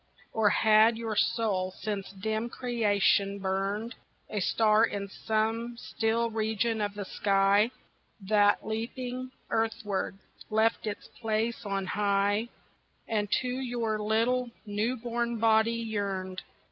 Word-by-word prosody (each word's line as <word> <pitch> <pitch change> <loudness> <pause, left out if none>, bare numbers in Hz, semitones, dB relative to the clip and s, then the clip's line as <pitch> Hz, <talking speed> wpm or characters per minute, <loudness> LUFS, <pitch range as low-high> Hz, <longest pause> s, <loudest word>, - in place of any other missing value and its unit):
Or 220 -2 +4
had 220 +2 +5
your 225 -2 -3
soul 205 -5 +1
since 205 -3 -3
dim 220 +4 -2
creation 205 -5 +1
burned, 200 +4 -2 0.4
A 210 - -1
star 215 +3 +3
in 200 -3 -1
some 225 +3 -1
still 230 0 -1
region 220 0 0
of 205 0 -2
the 205 -1 -4
sky, 200 +2 +3 0.5
That 205 0 +3
leaping 245 +3 -4 0.2
earthward, 225 -4 -1 0.3
left 220 +1 +2
its 205 - -5
place 225 0 -2
on 195 -1 -1
high 205 +3 +1 0.6
And 210 -2 -1
to 255 - -3
your 235 -4 -1
little 230 +4 +1 0.2
new 215 +5 -1
born 235 0 -2
body 220 0 +4
yearned? 200 -5 -3
220 Hz, 120 wpm, -29 LUFS, 205-230 Hz, 0.6 s, had